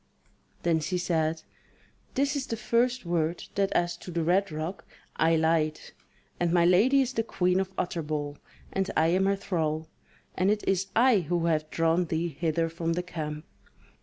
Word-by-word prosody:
Then 165 -2 +2
she 180 +4 -2
said: 160 -2 0 0.7
"This 280 +2 +1
is 275 -2 -2
the 230 - -3
first 240 0 +1
word, 170 0 -1
that 200 -1 +1
as 175 0 +1
to 180 - -10
the 170 -1 -1
Red 185 +3 +2
Rock, 155 +5 -4 0.3
I 165 +1 +3
lied; 160 -1 +2 0.6
and 175 -1 +1
my 170 -1 +4
lady 220 +11 +5
is 260 -1 -1
the 225 - +1
Queen 180 -4 +1
of 190 0 -2
Utterbol, 150 -4 -3 0.4
and 195 0 0
I 160 +1 +4
am 190 +3 +2
her 200 - +3
thrall, 160 -5 -2 0.5
and 185 +2 +1
it 210 0 0
is 195 0 +1
I 240 -2 +5
who 170 0 -1
have 155 -2 0
drawn 165 +2 +2
thee 165 +1 -1
hither 165 +1 -1
from 165 0 -2
the 180 +1 -2
camp." 155 -3 -5
170 Hz, 175 wpm, -28 LUFS, 160-195 Hz, 0.7 s, lady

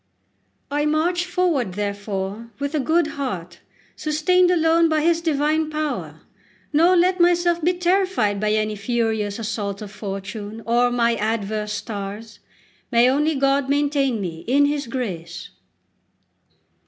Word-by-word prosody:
I 295 +1 +1
march 345 +4 +1
forward, 335 - 0
therefore, 200 +1 -4
with 285 +1 -3
a 305 - +1
good 320 +4 +2
heart, 220 - -5 0.4
sustained 355 +4 +2
alone 330 -1 +3
by 310 -1 +2
His 335 +1 +2
divine 310 0 +1
power; 305 -1 -4 0.5
nor 335 +5 +5
let 365 +1 +3
myself 345 -1 +3
be 355 +3 +3
terrified 355 - +1
by 210 0 +1
any 215 0 0
furious 220 -1 -1
assault 210 -3 -3
of 210 -2 -8
fortune 205 +2 -6
or 240 +1 +3
my 235 -1 +2
adverse 210 -1 -2
stars. 205 0 -6 0.5
May 235 0 +5
only 300 +3 +1
God 275 0 +1
maintain 280 -4 +1
me 165 -4 -5
in 280 +4 +4
His 285 -2 -1
grace! 185 -9 -5
255 Hz, 130 wpm, -22 LUFS, 210-315 Hz, 0.5 s, nor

